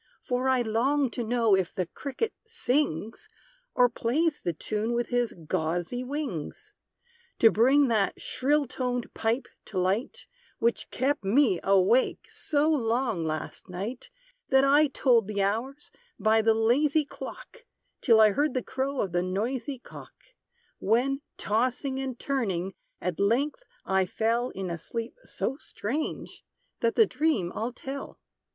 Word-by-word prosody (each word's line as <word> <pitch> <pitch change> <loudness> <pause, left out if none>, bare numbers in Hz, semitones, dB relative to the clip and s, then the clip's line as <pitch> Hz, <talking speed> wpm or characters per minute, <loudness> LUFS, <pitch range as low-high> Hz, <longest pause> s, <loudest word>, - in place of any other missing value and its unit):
For 250 +1 -1
I 255 -2 +3
long 255 +4 +1
to 240 - -3
know 230 -2 +2
if 190 -2 -1
the 185 - 0
cricket 280 - -4
sings, 255 - -1 0.5
Or 250 - +6
plays 290 +7 0
the 175 - -1
tune 215 +8 -2
with 240 0 -1
his 245 -1 +1
gauzy 175 +11 -1
wings; 285 - -5 0.6
To 225 - +6
bring 265 +6 +4
that 215 -4 +1
shrill 290 +3 +1
toned 250 -1 -3
pipe 225 +4 -1 0.2
to 195 - -7
light 190 +8 -1 0.3
Which 235 +1 0
kept 275 0 0
me 205 -2 +3
awake 195 +6 +3
so 295 0 0
long 235 - +1
last 155 +4 -4
night, 205 +8 -5 0.4
That 265 0 +5
I 290 +2 +5
told 245 -6 +3
the 200 -2 0
hours 245 +9 -2 0.3
by 220 +1 +3
the 220 0 +3
lazy 280 +7 +3
clock, 480 - -10 0.3
Till 230 -4 +5
I 215 -1 +7
heard 290 +4 0
the 255 - 0
crow 270 +1 -2
of 190 - -2
the 175 0 +1
noisy 230 +9 -2
cock; 250 - -12 0.6
When, 255 +7 +1 0.2
tossing 255 +5 0
and 265 -2 -4
turning, 195 -10 -2 0.3
at 180 -3 -3
length 255 - +1 0.2
I 190 -1 +2
fell 230 +5 0
In 190 -2 -5
a 170 - -4
sleep 230 +7 -5
so 270 - -3
strange, 290 0 -5 0.4
that 230 -1 +1
the 450 - +6
dream 295 - 0
I'll 230 +3 -2
tell. 270 +3 -7
240 Hz, 145 wpm, -28 LUFS, 210-275 Hz, 0.6 s, I